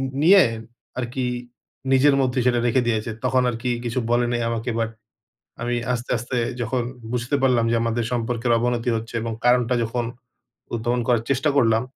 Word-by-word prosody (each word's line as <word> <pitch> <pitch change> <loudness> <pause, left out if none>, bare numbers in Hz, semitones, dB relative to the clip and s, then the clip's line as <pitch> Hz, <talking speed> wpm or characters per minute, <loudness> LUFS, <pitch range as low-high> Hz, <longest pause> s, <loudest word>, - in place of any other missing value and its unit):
উ - - -3
নিয়ে 190 +2 +8 0.6
আরকি 125 +2 -3 0.7
নিজের 135 +2 +5
মধ্যেই 125 -1 +1
সেটা 120 -1 +3
রেখে 125 +2 +3
দিয়েছে। 110 0 0 0.2
তখন 130 0 +3
আরকি 120 +1 -3 0.2
কিছু 120 +2 -1
বলেনি 120 0 +2
আমাকে 115 +1 -2
বাট, 115 0 -1 0.7
আমি 120 0 -1 0.2
আস্তে, 120 0 -4
আস্তে 125 +2 -4 0.2
যখন 120 +2 -1 0.3
বুঝতে 125 +2 -1
পারলাম 125 -3 +3
যে - - +3
আমাদের 115 0 0
সম্পর্কের 120 0 0
অবনতি 120 0 0
হচ্ছে 115 +1 -7
এবং 115 0 -3
কারণটা 125 0 +3
যখন 120 +1 -2 0.7
উদ্ভাবন 120 +2 0
করার 120 -3 +3
চেষ্টা 140 +3 +2
করলাম, 115 -3 +4
120 Hz, 160 wpm, -23 LUFS, 115-125 Hz, 0.7 s, নিয়ে